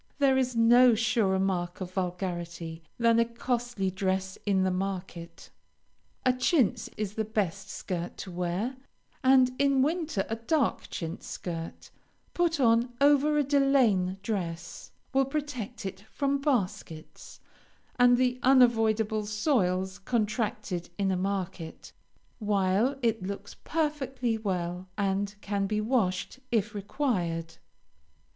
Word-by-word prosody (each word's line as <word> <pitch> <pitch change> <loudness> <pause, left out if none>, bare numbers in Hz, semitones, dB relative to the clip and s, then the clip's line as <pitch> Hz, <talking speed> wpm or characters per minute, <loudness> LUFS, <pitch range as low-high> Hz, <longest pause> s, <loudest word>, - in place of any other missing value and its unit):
There 275 -2 +4
is 255 -2 +1
no 240 +1 +6
surer 225 -4 +2
mark 180 -2 -1
of 185 -2 -5
vulgarity, 175 -3 -4 0.2
than 230 -1 +4
a 230 - +4
costly 235 -4 -2
dress 190 0 -1
in 190 -2 +3
the 190 - +1
market. 180 -3 -5 0.7
A 255 - +5
chintz 250 - +2
is 210 -2 -3
the 220 - -1
best 200 -2 -2
skirt 175 -4 -5
to 190 - -7
wear, 180 +9 -2 0.5
and 260 -1 +5
in 275 -2 +4
winter 310 - -1
a 225 - -3
dark 250 +4 0
chintz 165 0 -5
skirt 165 -2 -6 0.4
put 340 -3 +1
on 235 -1 +3
over 290 +1 +4
a 295 - +4
delaine 260 -10 +3
dress, 170 -6 -4 0.2
will 270 0 +4
protect 260 -6 -4
it 190 0 -5
from 280 -1 0
baskets, 200 - -3 0.6
and 245 0 +6
the 250 0 +1
unavoidable 225 -4 +3
soils 195 - 0
contracted 215 -4 -2
in 195 -1 +1
a - - +1
market, 185 -3 -4 0.5
while 205 +4 +1
it 225 -1 +1
looks 200 +2 -6
perfectly 270 -6 -1
well, 180 -4 -3
and 200 0 -1
can 200 -1 -1
be 210 +1 0
washed 215 -1 0
if 220 -2 +1
required. 190 - -2
215 Hz, 125 wpm, -28 LUFS, 190-250 Hz, 0.7 s, no